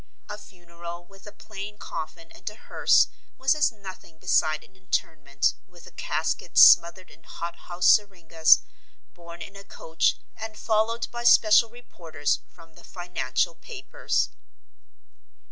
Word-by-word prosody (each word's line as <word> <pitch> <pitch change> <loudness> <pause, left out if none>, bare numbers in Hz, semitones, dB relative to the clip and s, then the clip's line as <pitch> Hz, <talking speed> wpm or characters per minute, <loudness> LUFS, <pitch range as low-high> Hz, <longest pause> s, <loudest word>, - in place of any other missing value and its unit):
A - - -7
funeral 170 -2 -11
with 195 +2 -18
a - - -9
plain 205 0 -10
coffin 165 -1 -8
and - - -8
a 210 - -14
hearse - - +2 0.3
was 265 +1 +2
as 300 -3 +1
nothing 190 -6 -13
beside 155 -1 0
an 190 - -23
interment, 150 -6 -2
with 175 -2 -17
a - - -14
casket 160 +2 -4
smothered 175 +2 +6
in 165 - -20
hot 170 0 -7
house 175 0 -3
syringas, 170 -6 +4 0.5
borne 170 -1 -11
in 195 - -12
a 200 - -11
coach 165 -4 -1 0.2
and 220 -1 -8
followed 225 +1 -1
by 240 0 -6
special 225 -1 +5
reporters 165 -11 -4
from 165 -2 -19
the - - -18
financial 175 -2 -3
papers. - - -3
175 Hz, 140 wpm, -25 LUFS, 165-210 Hz, 0.5 s, smothered